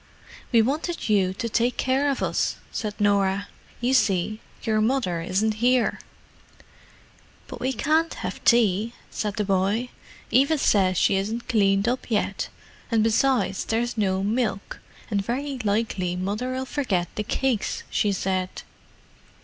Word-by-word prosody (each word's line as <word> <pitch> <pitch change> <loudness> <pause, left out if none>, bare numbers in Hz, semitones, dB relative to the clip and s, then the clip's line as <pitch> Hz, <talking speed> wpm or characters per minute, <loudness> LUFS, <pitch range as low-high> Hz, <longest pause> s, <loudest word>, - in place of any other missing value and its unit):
"We 230 -3 +5
wanted 310 +4 -2
you 195 -3 +3
to 230 - -3
take 235 +2 +1
care 265 +2 +1
of 275 - -1
us," - - 0 0.2
said 210 -2 -4
Norah. 200 -1 +2 0.3
"You 250 +2 +1
see, 215 -3 +2 0.2
your 215 -1 +1
mother 215 -8 0
isn't 200 +6 0
here." 245 -1 +3 1.5
"But - - -9
we 260 - 0
can't 315 +5 +1
have - - -5
tea," 225 -1 +3 0.2
said 210 -2 -3
the 215 - 0
boy. 200 +5 +1 0.4
"Eva 275 +7 +4
says 190 -8 +3
she 195 - +3
isn't 220 +5 -3
cleaned 200 -3 +2
up 250 +1 -1
yet, 205 -3 -1 0.4
and 225 -2 +3
besides, 220 -4 +2
there's 235 +2 -1
no 190 -3 0
milk, 215 -2 -1 0.3
and 200 -1 +1
very 265 +5 -3
likely 200 -4 0
Mother'll 245 +8 -2
forget 205 -12 -1
the - - -2
cakes, 245 0 -1
she 205 - +2
said." 185 -1 -2
215 Hz, 140 wpm, -25 LUFS, 195-250 Hz, 1.5 s, We